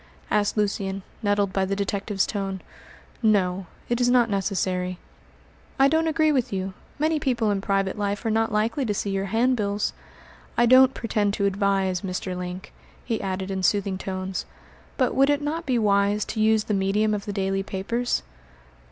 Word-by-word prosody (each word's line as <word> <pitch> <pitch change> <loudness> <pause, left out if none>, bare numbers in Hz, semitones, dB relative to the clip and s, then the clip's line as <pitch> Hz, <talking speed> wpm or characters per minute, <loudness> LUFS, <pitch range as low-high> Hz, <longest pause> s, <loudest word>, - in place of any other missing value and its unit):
asked 210 +1 +1
Lucian, 195 -2 -1 0.2
nettled 205 -2 +1
by 195 - +1
the 195 +1 -1
detective's 200 0 -1
tone. 195 -2 -3 0.6
"No; 190 -4 +2 0.2
it 240 +1 0
is 245 - +4
not 245 -3 +4
necessary." 185 -2 -1 0.8
"I 270 - +6
don't 320 +3 +2
agree 310 0 +3
with 260 -5 0
you. 190 -1 -3 0.2
Many 310 +1 +1
people 235 -6 +1
in 200 -1 -1
private 195 0 0
life 205 +2 -2
are 225 - +1
not 225 +1 +1
likely 225 +7 0
to 210 -3 -1
see 200 - -2
your 195 0 -1
handbills. 215 -1 +1 0.6
I 240 - +5
don't 255 +2 +6
pretend 210 -3 0
to 200 - 0
advise, 195 -2 +1
Mr. 185 -1 -3
Link," 180 +1 -6 0.3
he 230 -3 -1
added 190 0 -3
in 190 -1 -2
soothing 195 0 +1
tones, 185 -1 -4 0.5
"but 255 -2 +2
would 275 +1 +4
it 290 -1 +3
not 315 +2 -3
be 255 -2 +2
wise 205 -1 +2
to 220 - -4
use 220 0 +4
the 210 - -2
medium 200 +2 +1
of 205 -1 -3
the 205 - -3
daily 195 -1 0
papers?" 215 +5 -2
205 Hz, 175 wpm, -25 LUFS, 195-230 Hz, 0.8 s, I